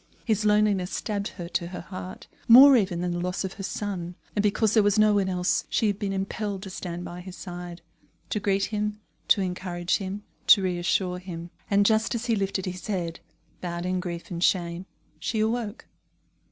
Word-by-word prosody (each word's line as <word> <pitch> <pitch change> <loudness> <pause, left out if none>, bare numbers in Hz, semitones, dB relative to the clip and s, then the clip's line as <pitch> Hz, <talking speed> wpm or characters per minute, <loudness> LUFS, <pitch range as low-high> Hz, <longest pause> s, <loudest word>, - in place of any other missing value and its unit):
His 215 -2 +1
loneliness 210 -3 +3
stabbed 205 -2 -2
her 175 -2 -7
to 170 -1 -1
her 180 +1 -6
heart, 185 +1 -8 0.2
more 265 +4 +10
even 185 -7 +1
than 180 0 -1
the 175 - -2
loss 180 +2 -2
of 190 - -4
her 205 - -9
son; 185 -3 -4 0.2
and 205 - +2
because 210 +1 +2
there 220 - +6
was 205 0 +2
no 215 0 +5
one 195 -2 +2
else, 180 -1 +1
she - - +1
had 205 -1 0
been 200 -1 -2
impelled 195 0 -3
to 190 - -7
stand 175 -1 -5
by 175 +1 -7
his 185 0 -9
side, 175 -2 -8 0.5
to 210 - 0
greet 195 -1 +1
him, 210 0 -2 0.3
to 200 - +5
encourage 180 -1 -1
him, 195 +1 -5 0.2
to 200 - +8
reassure 180 0 0
him. 175 -2 -8 0.2
And 200 0 +4
just 220 +2 +2
as 235 +1 -3
he 235 -2 +2
lifted 195 -1 -1
his 185 +1 -6
head, 175 -5 -2 0.4
bowed 175 -1 -4
in 185 0 0
grief 175 -1 -6
and 170 0 -2
shame, 175 0 +1 0.3
she 220 - -2
awoke. 220 0 -1
190 Hz, 195 wpm, -26 LUFS, 180-210 Hz, 0.5 s, more